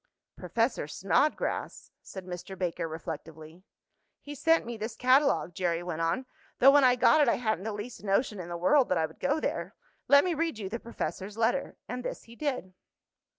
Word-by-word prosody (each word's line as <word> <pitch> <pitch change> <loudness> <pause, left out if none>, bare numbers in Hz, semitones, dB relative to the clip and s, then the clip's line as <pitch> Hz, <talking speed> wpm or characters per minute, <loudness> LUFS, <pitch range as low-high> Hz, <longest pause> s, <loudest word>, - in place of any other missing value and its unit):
"Professor 230 - -1
Snodgrass," 195 - -1
said 190 -2 -9
Mr. 180 +1 -7
Baker, 175 -2 -2
reflectively. 160 0 -8 0.6
"He 290 - -9
sent 325 +3 +2
me 235 0 -5
this 220 +1 -5
catalogue," 255 -7 +3
Jerry 175 -1 -1
went 170 -2 -4
on, 165 +11 0 0.3
"though 270 +2 +7
when 285 0 +5
I 250 -1 +6
got 305 +5 +5
it 285 - +4
I - - +3
hadn't 220 -5 -2
the 220 - -2
least 210 +4 -7
notion 205 +1 0
in 175 -1 -7
the 175 - -4
world 255 +10 +3
that 185 - +2
I 160 - +2
would 160 - -12
go 285 +3 +1
there. - - -3 0.3
Let 280 0 +7
me 360 - +1
read 325 -5 -1
you 200 -3 -5
the 230 +4 -4
professor's 210 -3 -5
letter"; 235 +4 0
and 250 0 -5
this - - -5
he 230 - -15
did. 255 -10 -3
220 Hz, 195 wpm, -29 LUFS, 180-260 Hz, 0.6 s, though